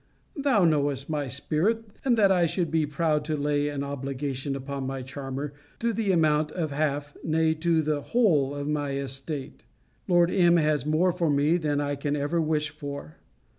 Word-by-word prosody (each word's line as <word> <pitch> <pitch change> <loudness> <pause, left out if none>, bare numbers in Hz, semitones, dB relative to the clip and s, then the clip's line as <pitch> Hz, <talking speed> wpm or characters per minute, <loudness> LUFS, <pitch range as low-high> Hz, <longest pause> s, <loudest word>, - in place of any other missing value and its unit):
Thou 270 - +3
knowest 145 -2 +1
my 145 -2 -1
spirit; 155 - 0 0.2
and 245 -3 +2
that 200 -3 +5
I 175 -2 +4
should 170 -1 -1
be 160 -2 +1
proud 150 0 0
to 155 0 -1
lay 145 0 0
an 140 -1 -3
obligation 135 0 -3
upon 135 0 -4
my 135 -1 -4
charmer 135 +2 -5 0.2
to 235 0 0
the 215 -2 0
amount 155 -3 +2
of 160 -5 -2
half, 145 0 -1
nay, 160 0 +2
to 160 0 +1
the 150 -1 0
whole 150 - +2
of 145 0 -4
my 145 -2 -1
estate. 135 +1 -4 0.4
Lord 175 0 +4
M. 175 -3 +4
has 150 -2 +1
more 165 +4 +3
for 170 -2 0
me 145 +4 +3
than 150 -4 0
I 145 0 -1
can 145 +1 -2
ever 145 +4 0
wish 155 -1 0
for. 140 - -8
150 Hz, 180 wpm, -27 LUFS, 140-165 Hz, 0.4 s, that